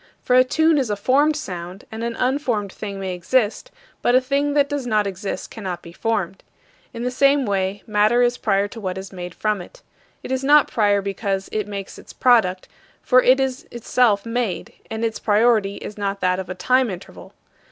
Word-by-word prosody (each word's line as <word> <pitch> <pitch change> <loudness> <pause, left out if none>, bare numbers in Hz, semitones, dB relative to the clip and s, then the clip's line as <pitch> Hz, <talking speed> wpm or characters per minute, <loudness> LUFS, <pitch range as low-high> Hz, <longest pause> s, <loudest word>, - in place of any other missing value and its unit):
For 250 - +2
a 255 - +7
tune 315 +4 +2
is 255 -5 -1
a 205 - 0
formed 275 +9 +2
sound; 180 - -7
and 220 +1 -5
an 235 0 -3
unformed 250 -6 -1
thing 200 -2 -6
may 190 -1 -3
exist, 215 - 0 0.3
but 245 - +3
a - - +7
thing 280 +2 -1
that 285 -1 +4
does 285 -3 -3
not 215 -3 +2
exist 195 +1 -5
cannot 190 -6 -6
be 170 - -11
formed. 195 -3 -2 0.5
In 235 0 -6
the 250 - -1
same 275 +1 +3
way, 195 -1 -1
matter 215 +3 +3
is 245 0 +1
prior 200 -1 +1
to 225 0 -9
what 185 -2 -3
is 190 +1 -8
made 180 -1 -7
from 210 -3 -1
it. - - -14 0.4
It - - -6
is 260 0 -1
not 295 +2 +6
prior 205 -3 +2
because 195 0 -3
it 215 -1 -2
makes 200 -1 -7
its - - -13
product, 220 -8 +3 0.4
for 255 0 +5
it 255 +2 +4
is 265 +3 -2
itself 235 -3 +1
made; 230 -5 -3 0.2
and 225 +1 -2
its 225 -1 -3
priority 215 -2 +2
is 210 - -8
not 200 0 -2
that 180 0 +1
of 190 - -6
a 185 - -4
time 255 +6 +2
interval. 185 -1 -10
220 Hz, 205 wpm, -21 LUFS, 195-255 Hz, 0.5 s, a